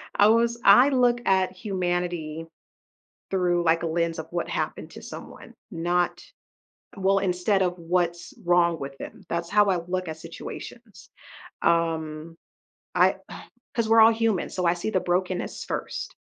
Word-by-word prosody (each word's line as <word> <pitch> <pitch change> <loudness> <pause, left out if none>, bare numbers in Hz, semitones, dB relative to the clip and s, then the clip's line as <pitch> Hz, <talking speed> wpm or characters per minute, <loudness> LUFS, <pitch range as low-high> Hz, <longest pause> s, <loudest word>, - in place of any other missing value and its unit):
I 205 - +6
was 235 +1 +3
I 245 +8 +7
look 245 -2 +2
at 190 -1 +2
humanity 175 -4 -3 0.8
through, 175 -2 +1
like, 165 +1 +2
a - - -1
lens 165 0 -1
of 160 - -5
what 175 -1 -2
happened - - -3
to - - -11
someone, - - -10 0.2
not 175 0 -1 0.8
Well, 195 +1 +2
instead 190 +1 +1
of 180 0 -1
what's 170 0 -1
wrong 170 -1 +3
with 135 0 -7
them. - - -10
That's 170 0 -2
how 210 0 +4
I 185 -2 +2
look 185 -1 -2
at 160 - -6
situations. 185 +5 -10 0.5
Um, 165 -1 0 0.6
I - - +4 0.6
'cause 225 -2 0
we're 225 0 +6
all 225 +1 +7
human, 225 -5 0
so 180 -1 -2
I 170 - +4
see 175 +5 -3
the 185 - +2
brokenness 180 +1 -2
first - - -5
180 Hz, 150 wpm, -25 LUFS, 170-200 Hz, 0.8 s, I